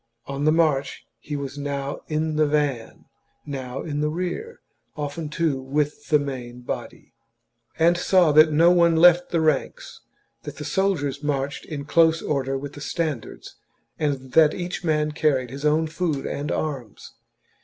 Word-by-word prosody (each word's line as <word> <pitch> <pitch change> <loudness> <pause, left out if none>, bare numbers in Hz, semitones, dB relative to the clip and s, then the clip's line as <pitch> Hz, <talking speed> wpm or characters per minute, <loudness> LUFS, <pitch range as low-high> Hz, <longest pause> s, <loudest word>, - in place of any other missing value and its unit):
On 140 +1 -3
the 155 - +5
march 155 -4 +1
he 150 - -6
was 140 0 -5
now 140 -1 -3
in 155 0 -1
the 155 0 +3
van, 145 -6 -2 0.4
now 135 -3 -5
in 150 -2 -3
the 150 - +1
rear, 185 - -4 0.4
often, 150 +1 -4
too, 150 -3 -1
with 145 +3 -2
the 150 - +5
main 125 -4 -6
body; 125 - -7 0.6
and 170 +2 +4
saw 180 -2 +3
that 155 +1 +6
no 165 +3 +5
one 170 -2 +4
left 175 +1 +6
the 170 - +1
ranks, - - -1 0.4
that - - -8
the - - -6
soldiers 185 -9 0
marched 140 -1 -2
in 145 -3 -6
close 165 +1 +4
order 135 -2 -1
with 140 +1 -7
the 145 - -10
standards, 150 -5 -4 0.4
and 135 -4 -2
that 155 +2 +5
each 180 +1 -5
man 150 -2 +1
carried 135 -5 0
his 140 +2 -6
own 155 +2 +3
food 160 -3 -2
and 145 +2 -3
arms. 135 -8 -5
150 Hz, 160 wpm, -24 LUFS, 140-160 Hz, 0.6 s, that